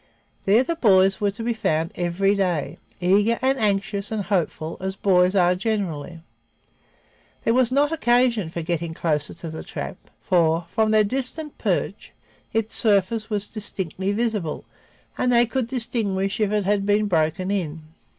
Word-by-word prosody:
There 215 +6 +5
the 335 +5 -2
boys 195 - +4
were 205 - +2
to 210 +3 -6
be 235 +1 0
found 165 -6 -1
every 180 +2 +1
day, 180 -7 -1 0.2
eager 205 +6 +3
and 265 +1 +1
anxious 200 -1 -1
and 215 -2 -1
hopeful 170 -5 -2
as 190 +1 -3
boys 185 -1 +3
are 180 -2 +4
generally. 180 -5 -3 1.2
There 230 - +2
was 255 -1 +3
not 285 +3 +2
occasion 240 - +2
for 170 0 -5
getting 165 0 -3
closer 150 -3 -1
to 165 - -7
the 160 - -6
trap, - - -6 0.2
for, 165 -2 +2
from 220 +3 +1
their 215 0 +5
distant 270 +7 -3
perch, - - -2 0.4
its 225 0 -1
surface 215 0 +1
was 205 -2 -1
distinctly 190 -3 -4
visible 210 -7 -2 0.5
and 250 - +2
they 240 0 +5
could 245 0 -2
distinguish 215 -6 -1
if 210 -2 +1
it 210 -2 0
had 200 0 +1
been 210 +1 +3
broken 175 +1 0
in. 165 -5 -3
200 Hz, 160 wpm, -23 LUFS, 180-225 Hz, 1.2 s, There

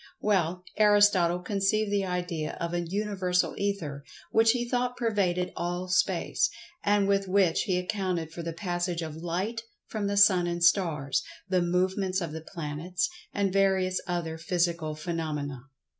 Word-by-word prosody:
Well, 180 -3 +1
Aristotle 205 -5 +5
conceived 205 +2 0
the 200 -1 +1
idea 175 -4 -3
of 170 0 -3
an 175 -1 -1
Universal 190 -2 0
Ether, 170 -9 -2 0.3
which 225 0 +4
he 240 +1 +2
thought 245 0 -1
pervaded 195 -6 0
all 175 +1 -3
space, 180 - +2 0.3
and 205 -1 +3
with 195 -1 +2
which 185 -1 +3
he 185 -4 +1
accounted 180 -3 -2
for 170 - -6
the 165 0 -4
passage 175 0 -2
of 155 -2 -6
light 185 +8 -2 0.2
from 210 -2 -3
the 200 0 -1
sun 190 -4 +6
and 175 0 -2
stars; 165 -7 +2 0.3
the 185 -1 +2
movements 185 +2 +1
of 170 -4 -4
the 160 +1 -6
planets, 165 - -3 0.2
and 200 -2 0
various 190 -1 +2
other 165 -2 -3
physical 170 -3 0
phenomena. 150 -5 -4
180 Hz, 150 wpm, -28 LUFS, 170-200 Hz, 0.3 s, sun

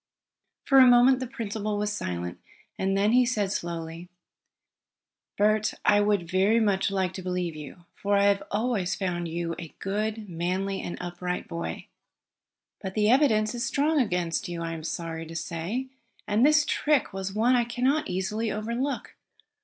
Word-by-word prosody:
For 270 -1 +5
a 260 - +9
moment 245 +1 +6
the 255 - -4
principal 215 -3 -3
was 210 0 -1
silent. 90 - -4 0.4
Then 195 +2 +2
he 250 +1 +5
said 215 -6 0
slowly: 170 -1 -5 1.3
"Bert, 215 +1 +2
I 205 0 +5
would 205 -4 +1
very 195 +6 +3
much 200 -4 +2
like 190 -2 -1
to 185 - -6
believe 180 -2 -2
you, 155 +3 -10
for 200 0 0
I 200 - +4
have 200 0 +3
always 210 -4 0
found 175 -3 -2
you 165 0 -3
a 165 -3 -9
good, 210 +2 -3
manly 185 +3 -2
and - - -5
upright 180 0 -4
boy. 170 -1 -5 1.0
But 190 -1 -5
the 215 0 +3
evidence 225 -6 +3
is 240 -1 -3
strong 285 +5 +2
against 180 -3 -1
you 170 -1 -4
I 165 0 -3
am 160 -1 -7
sorry 165 0 -4
to 165 - -9
say. 175 +11 -3 0.4
And 210 +3 +2
this 305 +1 +5
trick 295 -8 +1
was 195 0 -4
one 240 +4 +3
I 240 - +3
can 240 +1 -5
not 285 +4 +2
easily 210 +4 -1
overlook. 235 +6 -3
200 Hz, 165 wpm, -27 LUFS, 175-230 Hz, 1.3 s, a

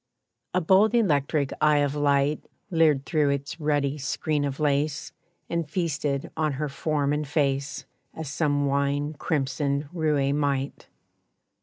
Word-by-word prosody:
A 180 - +3
bold 195 +7 +4
electric 145 - +1
eye 150 -1 +5
of 145 -1 +1
light 145 0 +1 0.3
Leered 155 -5 +3
through 150 -3 +2
its 140 +3 -3
ruddy 145 -1 0
screen 145 +2 -1
of 140 0 -4
lace 145 0 0 0.4
And 170 -3 -2
feasted 150 -5 -2
on 155 -2 0
her 145 +2 -3
form 145 0 0
and 150 0 -2
face 140 -1 -1 0.3
As 160 -1 -5
some 145 0 0
wine 140 +2 0
crimsoned 140 -1 -1
roué 150 -5 +1
might. 140 -2 -1
145 Hz, 135 wpm, -26 LUFS, 140-155 Hz, 0.4 s, eye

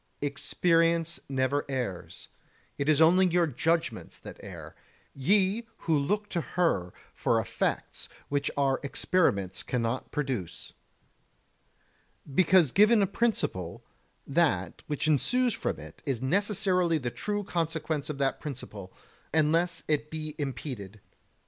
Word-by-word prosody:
Experience 165 +3 +1
never 135 +1 +1
errs; 125 -10 -4 0.5
it 140 +2 0
is 155 -1 +4
only 180 +4 +6
your 175 0 +3
judgements 160 -2 -1
that - - -11
err, - - -9 0.4
ye 200 - +2
who 165 - 0
look 205 +9 0
to 170 - -1
her 130 - 0 0.2
for - - +1
effects - - -2 0.2
which 140 -1 0
our 135 -2 +2
experiments 135 - +1
cannot 120 0 -2
produce. 130 - -4 1.6
Because 175 -2 +5
given 210 - +5
a - - +4
principle, 180 - -1 0.4
that 165 +2 +1
which 150 0 -1
ensues 245 - +3
from - - -2
it - - -12
is 135 -5 -1
necessarily 185 - +2
the 125 -5 -3
true 205 - -2
consequence 160 -4 -2
of 150 - -3
that 135 -1 0
principle, 110 -9 -7 0.4
unless 165 +2 +2
it 150 0 0
be 155 -1 -5
impeded. 120 -7 -5
155 Hz, 120 wpm, -29 LUFS, 135-175 Hz, 1.6 s, only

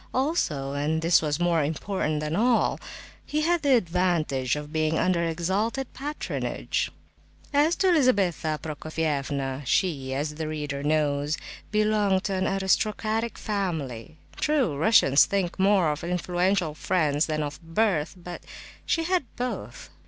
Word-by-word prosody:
Also—and 155 - 0
this 165 0 +5
was 150 -1 -1
more 170 -3 +2
important 155 0 -2
than 150 +1 -2
all—he 250 - -1
had 340 +1 +2
the 280 -3 +4
advantage 170 - +1
of 150 +1 -7
being 155 0 +1
under 180 -2 +2
exalted 190 +10 -1
patronage. 295 +3 -3 0.6
As 300 +4 +4
to 380 -2 +3
Lizabetha 195 - +2
Prokofievna, 145 -3 -2
she, 135 -2 0
as 150 +2 -2
the 155 0 -4
reader 150 -2 -4
knows, 150 0 +1 0.3
belonged 210 -3 +2
to 200 - -2
an 185 0 0
aristocratic 215 +4 0
family. 160 - -3 0.2
True, 280 - +1
Russians 145 -4 +5
think 190 -2 -2
more 190 -4 +4
of 150 - -5
influential 180 0 0
friends 155 -2 +1
than 155 -1 -1
of 145 -1 -6
birth, 165 -1 0
but 175 0 -8 0.5
she 330 - +1
had 360 -3 +1
both. 250 +1 -5
170 Hz, 130 wpm, -26 LUFS, 150-210 Hz, 0.6 s, this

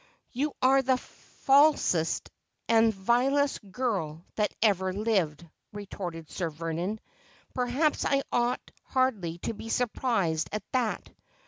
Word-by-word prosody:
'You 285 +4 -1
are 270 +1 +5
the 260 -1 +2
falsest 270 - +2 0.4
and 225 0 +5
the 205 - -14
vilest 265 +8 +2
girl 185 -9 -2
that 210 -1 0
ever 190 -4 +2
lived,' 185 -7 0 0.3
retorted 180 -5 -6
Sir 170 0 -3
Vernon. 165 +6 -3 0.3
' - - -30
Perhaps 260 +5 +1
I 275 0 +2
ought 240 +1 0
hardly 220 -11 0
to - - -2
be 225 +1 -8
surprised 215 -10 0
at 210 -1 -2
that. 250 -4 -1
220 Hz, 125 wpm, -28 LUFS, 175-255 Hz, 0.4 s, are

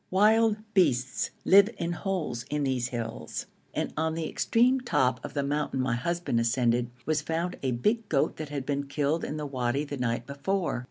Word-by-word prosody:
Wild 215 +3 +4 0.2
beasts 130 - +2 0.2
live 200 +2 +7
in 170 0 -2
holes 175 - -2
in 150 0 -1
these 130 -3 0
hills, 115 -2 -5 0.3
and - - -2
on 160 +1 0
the 165 -1 -2
extreme 250 +9 +2
top 130 - +1
of - - -7
the 140 - +1
mountain 145 -1 -1
my 130 -2 +1
husband 170 -1 -1
ascended, 120 0 +2 0.2
was 155 -1 +1
found 165 +4 -2
a 135 - 0
big 210 - 0
goat 140 -3 +1
that 155 -2 -5
had 140 -3 -4
been 140 0 -2
killed 145 +3 0
in 155 - -3
the 150 - -3
wadi 130 0 -1
the 145 -1 -5
night 120 -1 -1
before. 165 +3 -1
145 Hz, 185 wpm, -28 LUFS, 125-175 Hz, 0.3 s, live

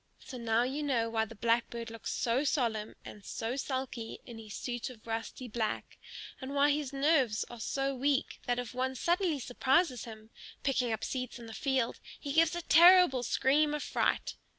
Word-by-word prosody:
So 255 -4 -9
now 230 0 +2
you 270 +4 -2
know 240 -6 0
why 220 -1 +1
the 225 +1 -12
Blackbird 230 +1 0
looks 230 - -5
so 245 +4 +1
solemn 230 -7 0
and 205 - -10
so 225 +4 -3
sulky 260 -4 -4
in 235 -2 -9
his 215 -2 -9
suit 245 0 -4
of 235 -4 -14
rusty 225 +2 -4
black; 220 -1 -3 0.4
and 265 +2 -5
why 285 +1 +5
his 290 -2 -1
nerves 275 -6 +2
are 240 - -9
so 275 +4 -1
weak 275 +1 0
that 245 0 +1
if 245 -1 -4
one 260 +1 -1
suddenly 345 +2 +1
surprises 265 - +1
him, 220 -1 -11 0.3
picking 255 -3 +1
up 220 - -2
seeds 255 -1 -3
in 235 - -10
the 225 - -9
field, 265 -2 0 0.2
he 285 -2 -4
gives 330 +1 +4
a 345 - -4
terrible 345 -5 +7
scream 295 +5 +2
of 300 - -3
fright. - - 0
255 Hz, 185 wpm, -31 LUFS, 230-280 Hz, 0.4 s, terrible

